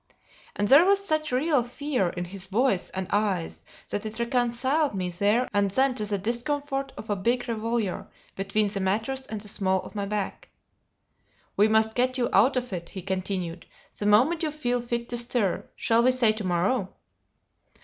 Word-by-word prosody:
And 205 Hz, -, 0 dB
there 280 Hz, +7 st, +8 dB
was 395 Hz, +1 st, +3 dB
such 310 Hz, -4 st, 0 dB
real 270 Hz, +1 st, +2 dB
fear, 250 Hz, -5 st, -1 dB
in 175 Hz, +1 st, -4 dB
his 190 Hz, +1 st, -5 dB
voice 210 Hz, -1 st, +1 dB
and 190 Hz, 0 st, -4 dB
eyes, 200 Hz, -5 st, -1 dB, 0.3 s
that 205 Hz, -, -2 dB
it 215 Hz, 0 st, -6 dB
reconciled 245 Hz, +4 st, +1 dB
me 180 Hz, -2 st, -2 dB
there 205 Hz, +7 st, +1 dB
and 200 Hz, -1 st, +2 dB
then 260 Hz, +6 st, +2 dB
to 215 Hz, -4 st, -1 dB
the 205 Hz, -1 st, 0 dB
discomfort 270 Hz, +6 st, -2 dB
of 215 Hz, -, -6 dB
a -, -, +2 dB
big 240 Hz, +6 st, 0 dB
revolver 225 Hz, -3 st, -2 dB, 0.3 s
between 205 Hz, +2 st, 0 dB
the 200 Hz, -, -3 dB
mattress 225 Hz, +8 st, -1 dB
and 215 Hz, -1 st, -5 dB
the 210 Hz, -, -10 dB
small 190 Hz, -2 st, 0 dB
of -, -, -11 dB
my 200 Hz, -2 st, -3 dB
back. 210 Hz, -1 st, -4 dB, 1.1 s
"We 210 Hz, -, +5 dB
must 220 Hz, 0 st, +2 dB
get 255 Hz, +2 st, +1 dB
you 240 Hz, -1 st, 0 dB
out 245 Hz, +7 st, +4 dB
of 250 Hz, -4 st, -3 dB
it," 170 Hz, -2 st, -5 dB
he 190 Hz, -, -8 dB
continued, 185 Hz, -2 st, -3 dB, 0.3 s
"the 205 Hz, -, -1 dB
moment 255 Hz, +11 st, +4 dB
you 315 Hz, -, 0 dB
feel 245 Hz, -5 st, -1 dB
fit 235 Hz, 0 st, -3 dB
to 240 Hz, -, -1 dB
stir. 235 Hz, -5 st, -1 dB
Shall 230 Hz, 0 st, +2 dB
we 255 Hz, +2 st, +4 dB
say 250 Hz, -4 st, +3 dB
to 215 Hz, 0 st, -5 dB
morrow?" 185 Hz, +4 st, 0 dB
220 Hz, 185 wpm, -26 LUFS, 195-255 Hz, 1.1 s, there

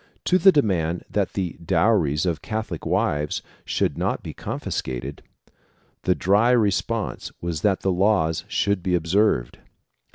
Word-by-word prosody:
To 185 Hz, -, +3 dB
the 190 Hz, +2 st, +7 dB
demand 90 Hz, -, 0 dB
that -, -, 0 dB
the 90 Hz, -5 st, -3 dB
dowries 85 Hz, -4 st, +2 dB
of 85 Hz, -4 st, -1 dB
Catholic 110 Hz, -7 st, -4 dB
wives 75 Hz, 0 st, 0 dB, 0.2 s
should -, -, -1 dB
not -, -, -1 dB
be -, -, -6 dB
confiscated, 65 Hz, +3 st, -5 dB, 0.8 s
the 90 Hz, -, +3 dB
dry 105 Hz, +6 st, +3 dB
response 115 Hz, -1 st, 0 dB
was 85 Hz, -3 st, -3 dB
that 100 Hz, -3 st, +1 dB
the 95 Hz, -, +1 dB
laws 90 Hz, -4 st, +2 dB
should 100 Hz, -2 st, 0 dB
be 90 Hz, 0 st, +1 dB
observed. 85 Hz, -, +1 dB
95 Hz, 135 wpm, -23 LUFS, 80-105 Hz, 0.8 s, the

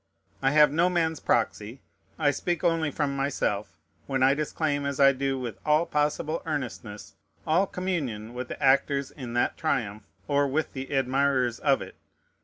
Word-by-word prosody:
I 135 Hz, -, +3 dB
have 150 Hz, 0 st, +5 dB
no 170 Hz, +4 st, +3 dB
man's 165 Hz, -3 st, 0 dB
proxy. 115 Hz, +1 st, -1 dB, 0.4 s
I 150 Hz, -3 st, +3 dB
speak 175 Hz, +4 st, -2 dB
only 165 Hz, -2 st, +2 dB
from 145 Hz, -1 st, -2 dB
myself, 105 Hz, -10 st, -2 dB, 0.3 s
when 135 Hz, -1 st, 0 dB
I 135 Hz, +1 st, +5 dB
disclaim, 150 Hz, 0 st, -1 dB
as 140 Hz, -1 st, -3 dB
I 140 Hz, 0 st, +7 dB
do 135 Hz, 0 st, -1 dB
with 120 Hz, -5 st, -5 dB
all 150 Hz, +2 st, +3 dB
possible 150 Hz, 0 st, -1 dB
earnestness, 125 Hz, -9 st, -5 dB, 0.3 s
all 175 Hz, +5 st, +2 dB
communion 140 Hz, -, -3 dB
with 125 Hz, 0 st, -5 dB
the -, -, -7 dB
actors 140 Hz, 0 st, +2 dB
in 125 Hz, -4 st, -8 dB
that 120 Hz, -, 0 dB
triumph, 110 Hz, -9 st, -1 dB, 0.3 s
or 145 Hz, 0 st, +2 dB
with 155 Hz, +4 st, -1 dB
the 135 Hz, 0 st, -5 dB
admirers 135 Hz, -2 st, +1 dB
of 140 Hz, -2 st, +2 dB
it. -, -, -12 dB
140 Hz, 165 wpm, -27 LUFS, 130-155 Hz, 0.4 s, I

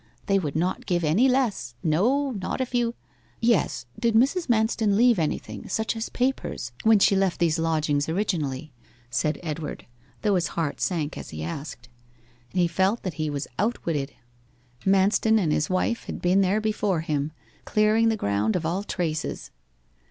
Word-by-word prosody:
They 195 Hz, 0 st, +3 dB
would 150 Hz, -6 st, -4 dB
not 175 Hz, +4 st, -1 dB
give 175 Hz, -1 st, +1 dB
any 190 Hz, +13 st, +4 dB
less; 230 Hz, -, 0 dB
no, 245 Hz, -, +2 dB
not 200 Hz, 0 st, -3 dB
if 255 Hz, -1 st, -3 dB
you 240 Hz, -1 st, +1 dB, 0.2 s
' -, -, -35 dB
'Yes. 215 Hz, -, +1 dB
Did 230 Hz, -1 st, +1 dB
Mrs. 275 Hz, +10 st, +3 dB
Manston 220 Hz, -2 st, +2 dB
leave 235 Hz, -1 st, +4 dB
anything, 155 Hz, -2 st, -3 dB
such 220 Hz, +1 st, -1 dB
as 225 Hz, +1 st, -3 dB
papers, 250 Hz, -, -2 dB
when 220 Hz, -1 st, +5 dB
she 195 Hz, 0 st, +4 dB
left 190 Hz, -2 st, +1 dB
these 165 Hz, -2 st, +2 dB
lodgings 155 Hz, -3 st, +1 dB
originally?' 155 Hz, -7 st, -2 dB, 0.4 s
said 150 Hz, +4 st, 0 dB
Edward, 155 Hz, -2 st, -5 dB, 0.4 s
though 210 Hz, -2 st, +3 dB
his 180 Hz, -2 st, +1 dB
heart 160 Hz, -4 st, -1 dB
sank 160 Hz, -5 st, -1 dB
as -, -, -8 dB
he 80 Hz, 0 st, -6 dB
asked. 125 Hz, -, -6 dB, 0.6 s
He 180 Hz, -2 st, +2 dB
felt 190 Hz, +6 st, +1 dB
that 185 Hz, -, -3 dB
he 155 Hz, -, 0 dB
was 145 Hz, -1 st, -3 dB
outwitted. 165 Hz, -10 st, -1 dB, 0.7 s
Manston 195 Hz, +3 st, +4 dB
and 175 Hz, -8 st, +1 dB
his 150 Hz, -, +1 dB
wife 185 Hz, +5 st, 0 dB
had -, -, -5 dB
been 185 Hz, +2 st, +3 dB
there 195 Hz, +3 st, +2 dB
before 210 Hz, -5 st, 0 dB
him, 150 Hz, -2 st, -1 dB, 0.3 s
clearing 215 Hz, +2 st, +3 dB
the 220 Hz, -, 0 dB
ground 100 Hz, -, 0 dB
of 170 Hz, -, -1 dB
all 175 Hz, +4 st, 0 dB
traces. 160 Hz, -6 st, -3 dB
185 Hz, 165 wpm, -25 LUFS, 155-220 Hz, 0.7 s, when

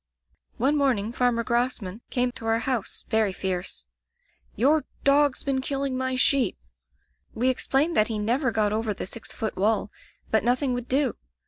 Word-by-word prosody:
"One 270 Hz, +5 st, +2 dB
morning 240 Hz, -7 st, +1 dB
Farmer 245 Hz, -1 st, +1 dB
Grosman 235 Hz, -4 st, -1 dB
came 250 Hz, 0 st, +1 dB
to 225 Hz, -2 st, -7 dB
our 225 Hz, 0 st, +3 dB
house, 235 Hz, -2 st, -2 dB
very 220 Hz, -3 st, +2 dB
fierce: 185 Hz, -1 st, -3 dB, 0.7 s
'Your 295 Hz, +5 st, +3 dB, 0.2 s
dog's 280 Hz, 0 st, +3 dB
been 270 Hz, -2 st, 0 dB
killing 275 Hz, 0 st, -1 dB
my 260 Hz, 0 st, -1 dB
sheep.' 255 Hz, -4 st, +2 dB, 0.8 s
We 250 Hz, +3 st, +2 dB
explained 275 Hz, +5 st, +1 dB
that 215 Hz, -, +4 dB
he 225 Hz, -, -2 dB
never 240 Hz, +6 st, +1 dB
got 215 Hz, -2 st, +1 dB
over 220 Hz, -1 st, -1 dB
the -, -, -5 dB
six 225 Hz, +4 st, -6 dB
foot 220 Hz, -2 st, -4 dB
wall, 205 Hz, +1 st, +1 dB, 0.4 s
but 220 Hz, -, +3 dB
nothing 250 Hz, +2 st, +1 dB
would 245 Hz, 0 st, -4 dB
do. 270 Hz, +1 st, +1 dB
245 Hz, 160 wpm, -26 LUFS, 220-265 Hz, 0.8 s, that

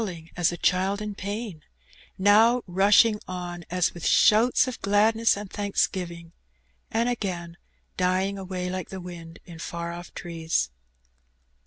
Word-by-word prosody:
waUing 170 Hz, -5 st, -7 dB
as 175 Hz, -1 st, +2 dB
a 175 Hz, -, -5 dB
child 190 Hz, +3 st, +1 dB
in 210 Hz, -1 st, -4 dB
pain; 200 Hz, -3 st, -5 dB, 0.6 s
now 220 Hz, +5 st, +5 dB
rushing 205 Hz, +4 st, +4 dB
on 175 Hz, -1 st, -6 dB
as 180 Hz, 0 st, +1 dB
with 175 Hz, -, -10 dB
shoots 230 Hz, +5 st, +4 dB
of 255 Hz, -, -6 dB
gladness 215 Hz, +2 st, +3 dB
and 205 Hz, -1 st, -7 dB
thanksgiving, 180 Hz, -4 st, -2 dB, 0.6 s
and 230 Hz, +2 st, 0 dB
again 180 Hz, -8 st, -3 dB, 0.4 s
dying 185 Hz, +2 st, +1 dB
away 185 Hz, -2 st, -4 dB
like 185 Hz, -1 st, -4 dB
tiie 190 Hz, -, -6 dB
wind 165 Hz, -2 st, -9 dB
in 165 Hz, -2 st, -11 dB
far 170 Hz, 0 st, -5 dB
off 175 Hz, +1 st, -9 dB
trees. 160 Hz, -, -2 dB
185 Hz, 140 wpm, -26 LUFS, 175-205 Hz, 0.6 s, now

